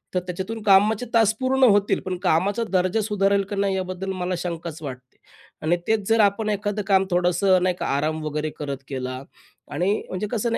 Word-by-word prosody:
तर - - +3
त्याच्यातून 190 +5 -5
कामाचे 210 +3 +4
तास 225 -2 +4
पूर्ण 260 +1 +1
होतील. 205 0 +2
पण 185 -1 -3
कामाचा 190 +5 +1
दर्जा 185 +3 +1
सुधारेल 200 -1 +1
की 205 - -3
नाही 195 -1 0
याबद्दल 185 0 -3
मला 180 0 -1
शंकाच 170 -2 -5
वाटते. 130 -2 -9 0.4
आणि 165 +3 +1
तेच 220 -3 +1
जर 225 0 +3
आपण 205 +1 +2
एखादं 205 0 -1
काम 195 -1 +4
थोडंसं 180 +1 +3
नाही 185 -1 +1
का, - - -2
आराम 155 +2 -1
वगैरे 150 0 -2
करत 140 -2 -3
केला. 130 -1 -4 0.5
आणि 175 +7 +1 0.2
म्हणजे 195 +3 -3
कसं 235 0 -1
ना - - +1
190 Hz, 185 wpm, -23 LUFS, 170-205 Hz, 0.5 s, कामाचे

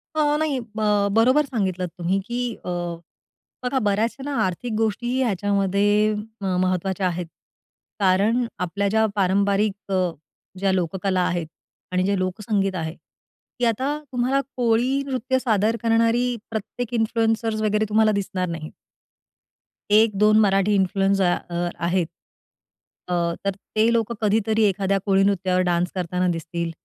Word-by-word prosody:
अ, 295 -1 +2
नाही, 310 -3 0
अ, - - -6
ब 210 -2 +2
बरोबर 255 +7 +4
सांगितलत 190 -8 -2
तुम्ही, 180 +3 0
की 245 -1 -2
अ, - - -3 0.9
बघा 255 +1 0
बऱ्याचशा 225 +6 0
ना, 285 -1 -3
आर्थिक 200 +6 -3
गोष्टी 225 +2 -1
ह्याच्यामध्ये 200 -2 +1 0.5
अ, - - -3 0.2
महत्त्वाच्या 185 +1 0
आहेत. 175 0 -3 0.7
कारण 205 +6 +3
आपल्या 200 +3 -1
ज्या 220 +2 +3
पारंपरिक 200 +1 +1
अ, 185 -2 +1 0.5
ज्या 195 0 +2
लोककला 185 +1 0
आहेत, 175 -2 -1 0.4
आणि 185 0 +1
जे 200 0 +1
लोकसंगीत 195 +1 -1
आहे, 160 -1 -4 0.6
की 245 - +2
आता 260 +6 0
तुम्हाला 255 +2 +1 0.2
कोळी 245 +3 +2
नृत्य 260 -1 -1
सादर 220 -3 +1
करणारी 230 +2 +2
प्रत्येक 225 +2 -5
इन्फ्लुएंसर्स 225 -1 0
वगैरे 215 0 +1
तुम्हाला 215 0 +4
दिसणार 195 -2 -2
नाहीत. 160 -2 -6 1.2
1-2 215 0 +5
मराठी 195 -1 +3
इन्फ्लुएन्सर 195 0 +2 0.2
अ, 175 0 -1 0.2
आहेत. 175 -1 0 1.0
अ, - - 0 0.3
तर 200 - +1 0.2
ते 220 +1 +4
लोकं 230 0 0
कधीतरी 220 +1 +2
एखाद्या 195 0 0
कोळी 195 -1 +3
नृत्यावर 185 -2 +1
डान्स 175 +1 +1
करताना 180 0 -1
दिसतील, 170 0 -4
205 Hz, 130 wpm, -23 LUFS, 185-230 Hz, 1.2 s, 1-2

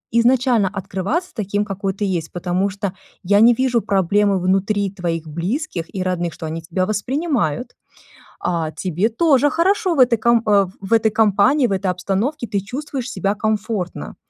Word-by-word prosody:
изначально 240 -3 +3
открываться 195 - -3
таким, 205 -2 -2
какой 195 -1 -3
ты 205 - -3
есть, 175 -5 -2
потому 180 +2 -1
что 200 -1 -4 0.3
я 200 +3 +3
не 235 +2 +7
вижу 250 -1 +1
проблемы 200 0 +2
внутри 195 +2 0
твоих 170 -4 -3
близких 175 - -4
и 185 - -1
родных, 175 -2 -2
что - - -8
они 160 +1 -4
тебя 170 +3 -1
воспринимают. 245 - -1 0.6
А 165 -3 -1
тебе 185 +5 -1
тоже 290 +3 +3
хорошо 370 +3 +1
в - - -2
этой 245 -2 +5
ком 235 0 +3
э, 200 -2 +4
в 195 +3 -3
этой 225 -1 +4
компании, 220 +7 +3
в - - -5
этой 195 0 -1
обстановке 205 - -2
ты 200 -1 -1
чувствуешь 255 +4 -5
себя 200 -5 -1
комфортно. 210 -3 -3
200 Hz, 165 wpm, -20 LUFS, 185-235 Hz, 0.6 s, не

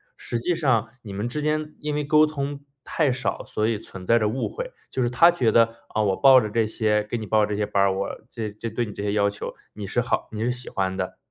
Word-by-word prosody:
实 120 - -4
际 175 +9 0
上 125 -9 +2
你 105 - -9
们 100 +4 -3
之 150 +5 -3
间 155 0 -1
因 150 0 -2
为 150 0 -1
沟 155 +1 +5
通 145 -2 -4 0.2
太 150 -5 +1
少， 125 0 -2
所 105 0 -1
以 115 -1 0
存 95 -3 -9
在 115 +5 +4
着 105 -2 +1
误 130 +5 -2
会， - - -6 0.2
就 130 - -2
是 120 - +1
她 145 +8 +6
觉 125 -9 +2
得： 115 0 +4 0.2
“呃， 110 - +1
我 95 -2 +2
报 135 +2 +7
着 110 - -2
这 115 +1 +1
些 105 -1 +1
给 105 +3 -4
你 110 -2 -6
报 110 +1 +3
这 105 0 -3
些 105 - +1
班 100 -1 +1
儿， 100 -1 +3
我 100 +1 -2 0.2
这 110 -4 -4
这 105 +3 -6
对 120 +2 -1
你 105 - -8
这 100 - -6
些 105 - 0
要 100 -1 +2
求， 100 - -6 0.2
你 105 - -6
是 100 +5 -1
好 120 - -1
你 110 +1 -3
是 125 - +1
喜 125 0 -6
欢 95 -1 -1
的。” 95 -1 -4
115 Hz, 290 characters per minute, -24 LUFS, 105-135 Hz, 0.2 s, 报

